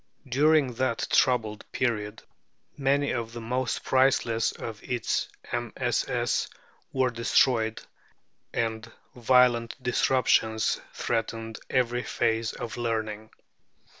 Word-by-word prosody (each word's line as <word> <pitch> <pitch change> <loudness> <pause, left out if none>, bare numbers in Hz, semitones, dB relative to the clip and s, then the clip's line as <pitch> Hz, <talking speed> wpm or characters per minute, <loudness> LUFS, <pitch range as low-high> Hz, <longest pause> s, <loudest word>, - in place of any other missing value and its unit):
During 140 +1 +3
that 120 -1 -1
troubled 110 -4 +2
period 110 -4 -2 0.5
many 140 0 +1
of 115 -2 -3
the 120 - -6
most 125 +2 -2
priceless 130 -3 +2
of 110 -2 -7
its 120 -3 -1 0.2
MSS. - - -1 0.4
were 130 -2 +1
destroyed, 115 -1 +2 0.7
and 110 0 -2 0.2
violent 120 -1 +3
disruptions 125 -3 +2
threatened 115 -1 -3
every 120 -1 +1
phase 115 -2 0
of 120 -1 -6
learning. 110 -2 -3
115 Hz, 95 wpm, -27 LUFS, 110-125 Hz, 0.7 s, During